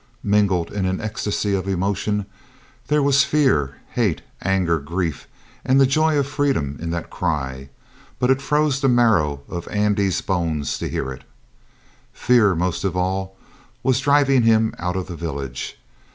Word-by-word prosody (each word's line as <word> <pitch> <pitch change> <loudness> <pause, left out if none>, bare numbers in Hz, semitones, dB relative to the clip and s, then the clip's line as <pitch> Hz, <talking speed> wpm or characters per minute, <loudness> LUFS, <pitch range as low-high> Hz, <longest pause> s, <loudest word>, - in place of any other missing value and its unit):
Mingled 100 -4 +2
in 95 -2 -1
an 95 0 -1
ecstasy 105 -1 -2
of 95 0 -1
emotion, 100 +2 -1 0.6
there 150 0 +2
was 140 0 +4
fear, 130 - +1
hate, 105 -10 0 0.2
anger, 90 -3 +1
grief, 80 0 -3 0.4
and 130 +1 +3
the 135 - +6
joy 155 +3 +2
of 140 - +2
freedom 135 - -1
in 85 - -3
that 85 0 -4
cry; 70 -6 -3 0.5
but 125 +1 +2
it 135 +1 +2
froze 150 -1 +1
the 135 - +3
marrow 105 - +3
of 85 -1 -6
Andy's 105 -2 +1
bones 85 -6 -1
to - - -3
hear 65 - -3
it. 65 - -9 0.9
Fear, 110 -7 +3
most 90 +1 -1
of 95 -2 -1
all, 95 +1 -2 0.5
was 130 -1 +2
driving 140 -1 +4
him 110 -1 +3
out 90 +1 -2
of 95 -1 -2
the 90 - -7
village. 70 -6 -5
95 Hz, 155 wpm, -21 LUFS, 85-125 Hz, 0.9 s, the